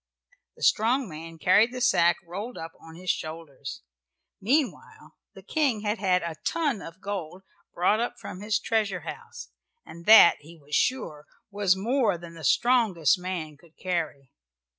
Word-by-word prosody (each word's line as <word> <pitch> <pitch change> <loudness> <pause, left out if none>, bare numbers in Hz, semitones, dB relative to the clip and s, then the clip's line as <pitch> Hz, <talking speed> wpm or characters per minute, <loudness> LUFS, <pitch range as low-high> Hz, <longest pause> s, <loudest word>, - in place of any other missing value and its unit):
The - - -11
strong 240 +4 +3
man 165 0 -9
carried 185 +9 +4
the 255 - -6
sack, 175 -8 +3
rolled 200 +8 -6
up, 165 0 -7
on 160 0 -13
his 180 +1 -1
shoulders. 155 - -7 0.6
Meanwhile 270 +6 -1 0.2
the - - -12
King 275 -9 0
had 210 +1 -2
had 185 -2 +2
a 165 -2 -5
ton 290 - -1
of 165 +2 -11
gold 190 -2 -5 0.3
brought 185 +5 +2
up 240 - -2
from 185 - -8
his 210 +1 0
treasure 210 -5 -1
house, - - -9 0.4
and 170 +2 -12
that, 215 -6 +9
he 165 +3 -15
was 150 -1 -16
sure, 155 - 0 0.2
was 200 -2 +2
more 220 -1 +1
than 170 0 -11
the 165 -1 -11
strongest 200 - +3
man 175 -5 -5
could 165 +1 -23
carry. 160 -7 -3
185 Hz, 160 wpm, -26 LUFS, 165-220 Hz, 0.6 s, that